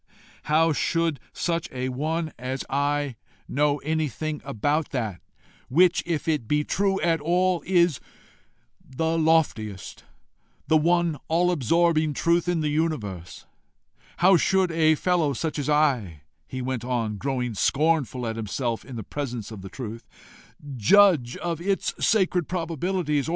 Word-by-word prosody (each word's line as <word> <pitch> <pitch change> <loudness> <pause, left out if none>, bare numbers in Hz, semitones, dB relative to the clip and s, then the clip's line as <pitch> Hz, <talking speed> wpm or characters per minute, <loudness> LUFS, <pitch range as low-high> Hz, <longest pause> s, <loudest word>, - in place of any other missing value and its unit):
How 160 +2 +3
should 165 -1 0
such 170 -1 -2
a 130 0 -3
one 155 +4 -2
as 130 +2 -4
I 145 -2 0 0.3
know 145 +1 +1
anything 155 0 -2
about 145 +8 -1
that 110 -9 -3 0.5
which, 175 +6 +4
if 165 -3 -2
it 150 -8 0
be 150 +3 +1
true 195 +4 0
at 165 -2 +1
all, 180 +2 +1
is 175 -6 +3 0.8
the 160 +5 -2
loftiest, 155 -12 0 0.6
the 160 - +2
one 170 0 +2
all 175 +2 +2
absorbing 160 +1 +2
truth 170 +3 +1
in 175 -2 +1
the 150 - 0
universe? 120 - -3 0.7
How 185 +1 +5
should 190 +1 +2
such 165 - -5
a 155 0 +5
fellow 175 -2 +1
as 150 +1 -3
I" 125 - +1 0.2
he 130 -1 -5
went 130 -2 -3
on, 115 -4 -2
growing 125 0 -2
scornful 135 +1 +1
at 115 0 -3
himself 115 +2 -3
in 130 - -10
the 110 - -5
presence 120 -4 -5
of 105 -3 -8
the 95 - -8
truth 115 0 -8 0.7
"judge 150 - +4
of 170 -1 -3
its 195 +2 -1
sacred 185 -6 +2
probabilities? 165 -3 -1
150 Hz, 140 wpm, -25 LUFS, 125-170 Hz, 0.8 s, How